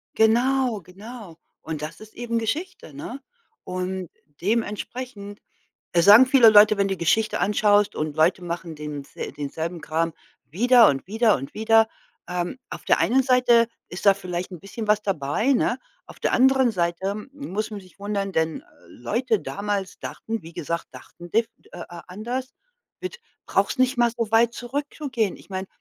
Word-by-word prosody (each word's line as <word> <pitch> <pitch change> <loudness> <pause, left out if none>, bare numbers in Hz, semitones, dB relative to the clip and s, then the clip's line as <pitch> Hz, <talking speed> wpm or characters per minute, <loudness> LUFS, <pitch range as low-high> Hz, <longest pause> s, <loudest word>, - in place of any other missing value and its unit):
Genau, 240 0 +3
genau. 195 0 -11 0.2
Und 155 -2 -5
das 155 +2 -6
ist 215 0 -13
eben 235 -1 -2
Geschichte, 295 - -4
ne? 240 - -7 0.4
Und 185 -1 -4 0.3
dementsprechend, 210 +1 -3 0.5
äh, 170 - +4
sagen 210 +8 +9
viele 255 -3 +7
Leute, 210 0 +7
wenn 200 - +2
du 195 - -1
die - - -17
Geschichte 215 +6 +1
anschaust, 205 0 +3
und 155 -1 -3
Leute 175 +4 +3
machen 170 -1 -5
dens 150 -2 -7
denselben 160 +4 -5
Kram 160 +1 -1 0.3
wieder 230 - +5
und 135 +3 -2
wieder 220 +2 +3
und 135 - -8
wieder. 225 +1 +4 0.4
Ähm, 180 +5 -3
auf - - -8
der - - +3
einen 260 +3 +3
Seite 245 -3 +4 0.2
ist 180 - -7
da 200 - +8
vielleicht 180 -1 -5
'n 180 - -8
bisschen 210 +4 -7
was 210 0 +3
dabei, 195 - 0
ne? 250 0 +1 0.3
Auf - - -14
der - - 0
anderen 265 -1 +4
Seite 180 +1 -1 0.2
muss 220 -7 -4
man 210 - -5
sich 185 - -19
wundern, 200 -1 -2
denn 160 -1 -1 0.2
Leute 220 - -1
damals 200 -1 -4
dachten, 225 0 -5
wie 165 +1 -11
gesagt, 170 0 -4
dachten 175 0 -13
dif 225 +1 +2 0.2
äh, 175 - -10
äh, 175 0 -9
anders, 240 +8 -5 0.5
mit 375 +6 -6 0.3
brauchst - - 0
nicht 255 0 +2
mal 240 -1 +3
so 230 -3 -2
weit 230 +1 +4
zurückzugehen. 260 - -3
Ich - - -18
meine, 190 0 -4
205 Hz, 165 wpm, -24 LUFS, 175-235 Hz, 0.5 s, sagen